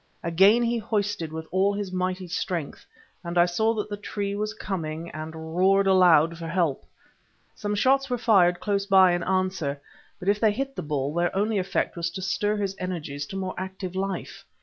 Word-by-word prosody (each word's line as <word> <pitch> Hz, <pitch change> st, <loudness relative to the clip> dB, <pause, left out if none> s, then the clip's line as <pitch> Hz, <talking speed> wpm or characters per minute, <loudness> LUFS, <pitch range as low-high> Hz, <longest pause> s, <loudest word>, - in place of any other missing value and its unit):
Again 195 Hz, +8 st, +5 dB
he 235 Hz, 0 st, 0 dB
hoisted 205 Hz, -6 st, -2 dB
with 160 Hz, 0 st, -6 dB
all 195 Hz, +2 st, +2 dB
his 200 Hz, -2 st, -4 dB
mighty 185 Hz, 0 st, -2 dB
strength, 175 Hz, -3 st, -4 dB, 0.4 s
and 170 Hz, 0 st, -4 dB
I 175 Hz, -, +6 dB
saw 220 Hz, +6 st, +1 dB
that 210 Hz, -1 st, -2 dB
the 205 Hz, -1 st, -5 dB
tree 205 Hz, -1 st, -4 dB
was 210 Hz, +1 st, -2 dB
coming, 165 Hz, -5 st, -4 dB
and 160 Hz, +1 st, -7 dB
roared 195 Hz, +2 st, +4 dB
aloud 170 Hz, -4 st, +5 dB
for 165 Hz, -, -5 dB
help. 165 Hz, -5 st, 0 dB, 0.7 s
Some 210 Hz, 0 st, -3 dB
shots 270 Hz, +5 st, +2 dB
were 250 Hz, -, 0 dB
fired 180 Hz, -7 st, +4 dB
close 200 Hz, 0 st, -1 dB
by 190 Hz, -2 st, +6 dB
in 175 Hz, 0 st, 0 dB
answer, 185 Hz, -6 st, -1 dB, 0.4 s
but 185 Hz, -, -8 dB
if 205 Hz, +1 st, +3 dB
they 215 Hz, -2 st, +3 dB
hit 270 Hz, +4 st, -4 dB
the -, -, -4 dB
bull, 145 Hz, -1 st, -2 dB
their 175 Hz, +2 st, 0 dB
only 205 Hz, +1 st, +1 dB
effect 185 Hz, -, -1 dB
was 170 Hz, -1 st, -2 dB
to -, -, -5 dB
stir 205 Hz, +3 st, 0 dB
his 195 Hz, -2 st, -2 dB
energies 150 Hz, -6 st, -4 dB
to -, -, -8 dB
more 190 Hz, -1 st, -3 dB
active 190 Hz, -1 st, -6 dB
life. 190 Hz, -1 st, -4 dB
185 Hz, 195 wpm, -25 LUFS, 170-205 Hz, 0.7 s, I